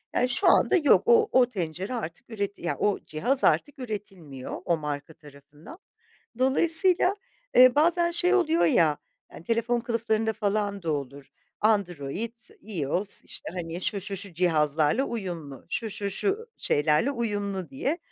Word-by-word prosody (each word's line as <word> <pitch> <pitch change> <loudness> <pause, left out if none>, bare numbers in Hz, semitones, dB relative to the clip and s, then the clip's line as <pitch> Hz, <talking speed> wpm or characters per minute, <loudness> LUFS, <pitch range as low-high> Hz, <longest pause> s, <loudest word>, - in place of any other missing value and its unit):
Yani, 250 - +2
şu 310 +10 +2
anda 355 - +4
yok 295 -5 +4
o 455 -2 +5
o 255 -1 +5
tencere 185 +1 -4
artık 175 -2 -7
üreti 200 -2 -4
ya, 175 - -2
o 205 -1 0
cihaz 245 - +1
artık 290 -1 +1
üretilmiyor, 195 - -7
o 170 - +1
marka 150 0 -5
tarafından. 145 - -15 0.6
Dolayısıyla, 335 +8 +4 0.4
eee, 255 0 +8
bazen 340 +3 +3
şey 355 +2 +1
oluyor 335 -3 +2
ya; 165 - +3 0.4
eee, 160 - -11
telefon 230 +3 0
kılıflarında 225 -1 -1
falan 205 -2 -2
da 160 -2 -1
olur. 140 -1 -6 0.3
Android, 200 - -1 0.3
IOS 190 0 -1
işte, - - -6
hani 170 -1 -5
şu, 200 +2 -1
şu, 195 +1 -6
şu 195 -2 -8
cihazlarla 155 - +2
uyumlu, 170 - -6
şu, 225 -2 -2
şu, 200 0 -4
şu 410 - -2
şeylerle 150 - +1
uyumlu 205 -7 -3
diye. 275 +5 -2
205 Hz, 145 wpm, -26 LUFS, 165-255 Hz, 0.6 s, eee